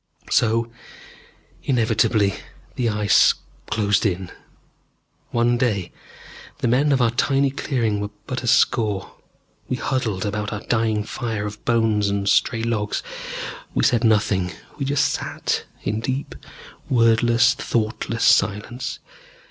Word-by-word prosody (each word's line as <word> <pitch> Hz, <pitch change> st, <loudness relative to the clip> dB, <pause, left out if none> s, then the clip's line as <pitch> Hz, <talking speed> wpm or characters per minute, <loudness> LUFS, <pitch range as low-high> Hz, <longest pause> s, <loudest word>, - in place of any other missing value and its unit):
So 115 Hz, 0 st, +2 dB, 0.9 s
inevitably 110 Hz, -4 st, +2 dB, 0.4 s
the 120 Hz, -2 st, 0 dB
Ice 105 Hz, -2 st, +4 dB, 0.3 s
closed 100 Hz, -2 st, +1 dB
in.... 95 Hz, -3 st, -1 dB, 1.0 s
One 120 Hz, 0 st, +1 dB
day 105 Hz, -8 st, 0 dB, 0.7 s
the -, -, -1 dB
men 135 Hz, +5 st, +3 dB
of 135 Hz, -3 st, +3 dB
our 115 Hz, -, +3 dB
tiny 135 Hz, +2 st, +2 dB
clearing 120 Hz, -7 st, -1 dB
were 105 Hz, 0 st, -3 dB, 0.2 s
but 130 Hz, -2 st, -4 dB
a 120 Hz, -, -5 dB
score. 105 Hz, -4 st, +2 dB, 0.6 s
We -, -, 0 dB
huddled 115 Hz, -7 st, -2 dB
about 105 Hz, 0 st, -2 dB
our 105 Hz, -, -4 dB
dying 110 Hz, -3 st, 0 dB
fire 110 Hz, -2 st, -4 dB
of 105 Hz, +1 st, -7 dB
bones 110 Hz, -3 st, +2 dB
and 100 Hz, 0 st, -1 dB
stray 115 Hz, +2 st, +2 dB
logs. 110 Hz, -3 st, -1 dB, 0.7 s
We -, -, +2 dB
said 120 Hz, -1 st, +3 dB
nothing. 100 Hz, -5 st, +2 dB, 0.3 s
We 140 Hz, -, -1 dB
just 140 Hz, +1 st, +2 dB
sat, -, -, -2 dB, 0.2 s
in 105 Hz, +2 st, -1 dB
deep, 130 Hz, +5 st, -3 dB, 0.6 s
wordless, 120 Hz, 0 st, +4 dB
thoughtless 115 Hz, 0 st, -2 dB
silence. 105 Hz, +5 st, +1 dB
115 Hz, 125 wpm, -22 LUFS, 105-120 Hz, 1.0 s, Ice